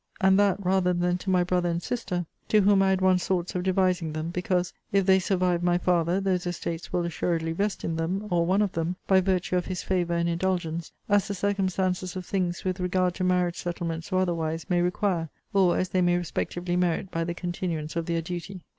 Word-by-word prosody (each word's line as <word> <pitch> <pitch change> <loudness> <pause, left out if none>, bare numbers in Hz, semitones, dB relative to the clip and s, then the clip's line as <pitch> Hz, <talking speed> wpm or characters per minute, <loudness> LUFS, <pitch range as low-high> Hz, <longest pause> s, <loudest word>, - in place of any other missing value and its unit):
and 190 -1 +4
that 200 -2 +3
rather 185 -1 +2
than 175 0 +1
to 180 +2 -5
my 180 -1 +4
brother 180 0 0
and 170 0 -2
sister, 185 -8 -2 0.2
to 215 - +4
whom 200 0 +5
I 195 - +3
had 190 -1 +1
once 185 -1 +3
thoughts 180 -2 -1
of 180 - -1
devising 185 -3 +1
them, 155 +2 -3
because, 180 0 -1 0.2
if 195 -1 +3
they 190 0 +5
survive 180 -2 +1
my 175 0 +2
father, 175 0 +1
those 185 -2 0
estates 170 -1 -4
will 175 -1 0
assuredly 165 -1 -1
vest 200 +5 -2
in 165 - -2
them, 180 +5 -2
or 170 -1 +3
one 190 +5 +2
of 200 - -1
them, 165 +2 -2
by 190 -1 +4
virtue 185 -1 0
of 180 - -1
his 185 -2 -3
favour 175 -2 0
and 170 0 +1
indulgence, 170 -1 -1 0.2
as 205 -1 +3
the 200 - -3
circumstances 185 -2 -1
of 185 -1 -5
things 180 -3 -2
with 185 0 -1
regard 180 0 +1
to 185 - -4
marriage 180 -1 +1
settlements, 170 0 -4
or 185 0 +2
otherwise, 165 -3 -2
may 175 -1 +3
require; 175 -2 0 0.2
or, 190 -3 +4
as 185 - 0
they 185 - +1
may 175 0 +3
respectively 175 +1 -2
merit 180 +1 0
by 165 - -1
the 170 +1 -3
continuance 170 -3 -3
of 170 0 -2
their 165 -1 -1
duty. 180 +2 -6
180 Hz, 215 wpm, -27 LUFS, 170-190 Hz, 0.2 s, whom